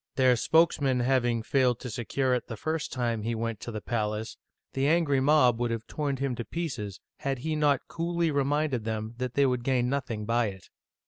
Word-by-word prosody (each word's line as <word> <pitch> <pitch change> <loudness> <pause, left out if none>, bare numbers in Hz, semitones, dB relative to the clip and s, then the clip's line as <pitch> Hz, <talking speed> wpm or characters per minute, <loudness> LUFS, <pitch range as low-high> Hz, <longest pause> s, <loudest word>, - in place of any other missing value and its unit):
Their 130 -2 +5
spokesman 140 -2 +3
having 120 -2 +1
failed 125 -1 +2
to 125 - -5
secure 125 +4 0
it 125 - -1
the 115 - -6
first 160 +5 -2
time 120 -4 -1
he 115 +2 -2
went 115 -1 -3
to 120 - -6
the 110 -1 -5
palace, 110 -1 -2 0.4
the 135 +1 +1
angry 155 -4 +3
mob 130 -4 +4
would 120 -1 0
have 115 -1 -3
torn 145 -3 -2
him 135 -1 -1
to 120 - -3
pieces, 125 - -4 0.2
had 135 -1 -2
he 155 +5 -2
not 145 -3 +2
coolly 170 -1 -1
reminded 140 -3 0
them 110 0 -3
that 125 -1 -3
they 140 - +4
would 125 -2 0
gain 125 -1 +1
nothing 125 -6 -2
by 115 +1 +2
it. 95 -2 -9
125 Hz, 200 wpm, -28 LUFS, 115-140 Hz, 0.4 s, Their